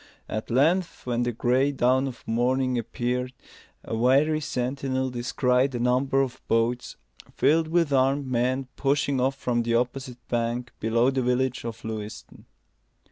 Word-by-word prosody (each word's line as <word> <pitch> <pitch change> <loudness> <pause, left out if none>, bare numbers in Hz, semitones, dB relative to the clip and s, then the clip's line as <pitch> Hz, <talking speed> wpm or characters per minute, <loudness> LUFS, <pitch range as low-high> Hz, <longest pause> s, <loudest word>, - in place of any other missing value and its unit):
At 110 - -4
length, 165 +9 +1
when 120 -1 0
the 120 0 0
gray 125 +4 +2
dawn 130 0 +2
of 125 -3 -9
morning 125 +3 +1
appeared, 125 +2 -2 0.5
a - - -4
wary 140 +7 +3
sentinel 130 -1 -2
descried 125 +2 +1
a - - -2
number 130 +3 +2
of 130 - -6
boats, 115 +2 0 0.4
filled 160 +1 +3
with 165 -3 +1
armed 135 +1 +2
men, 130 +1 0
pushing 140 -1 +1
off 135 +1 +1
from 125 -3 -1
the 115 0 0
opposite 125 0 -3
bank 120 +1 -2
below 115 +3 +2
the 135 -1 0
village 125 +1 0
of 115 -1 -6
Lewiston. 110 -1 -7
125 Hz, 145 wpm, -26 LUFS, 120-135 Hz, 0.5 s, wary